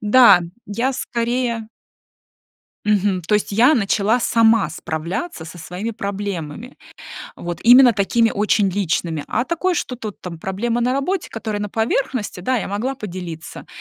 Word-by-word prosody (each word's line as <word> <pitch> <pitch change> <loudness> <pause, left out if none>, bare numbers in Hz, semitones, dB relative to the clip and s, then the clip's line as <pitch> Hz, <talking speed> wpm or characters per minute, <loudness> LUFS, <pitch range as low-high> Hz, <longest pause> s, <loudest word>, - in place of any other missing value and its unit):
Да, 215 -3 +7 0.3
я 235 +6 -1
скорее 235 -2 -2 1.2
Мгм. 200 -2 +2
То 190 +6 0
есть 210 - 0
я 240 +9 +5
начала 215 +1 +1
сама 225 -3 +3
справляться 170 - -4
со 170 +2 -10
своими 180 +7 -5
проблемами, 200 - -5 0.6
вот, 175 -1 -6
именно 245 0 +7
такими 225 +3 +2
очень 205 0 +2
личными. 170 -5 -1
А 245 - -1
такое, 350 +3 0
что 255 - -3
тут 215 -4 -7
там 170 -3 -7
проблемы 230 +7 -2
на 250 +1 +1
работе, 310 +8 -1
которые 215 -2 -4
на 210 - -3
поверхности, 225 -1 -1
да, 255 +8 0
я 215 - -3
могла 225 +7 -2
поделиться, 175 -7 -8
210 Hz, 145 wpm, -20 LUFS, 190-240 Hz, 1.2 s, Да